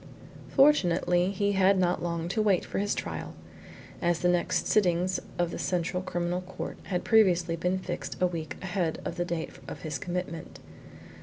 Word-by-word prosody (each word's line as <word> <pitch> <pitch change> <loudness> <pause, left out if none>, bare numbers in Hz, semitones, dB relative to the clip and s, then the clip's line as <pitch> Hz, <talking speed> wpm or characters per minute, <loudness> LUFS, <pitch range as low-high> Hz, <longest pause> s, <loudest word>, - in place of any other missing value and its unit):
Fortunately 180 - +4
he 200 +1 0
had 195 0 +4
not 180 -1 +1
long 170 -1 -2
to 215 +4 0
wait 200 -4 +2
for - - -3
his 205 +1 0
trial, - - -5 0.7
as 175 -1 +2
the 180 - +3
next 175 -1 +1
sittings 185 -2 +2 0.2
of 175 -1 0
the - - -5
Central 180 0 -1
Criminal 175 0 -2
Court 185 +1 -7
had 180 -2 -2
previously 180 -6 +4
been 180 +3 0
fixed 180 -2 -5
a 185 - +4
week 165 -5 -3
ahead 180 -4 -1
of 170 - -4
the 175 - 0
date 170 -2 -3 0.2
of - - -8
his 150 -4 -3
commitment. 175 -1 -5
180 Hz, 170 wpm, -28 LUFS, 170-190 Hz, 0.7 s, Fortunately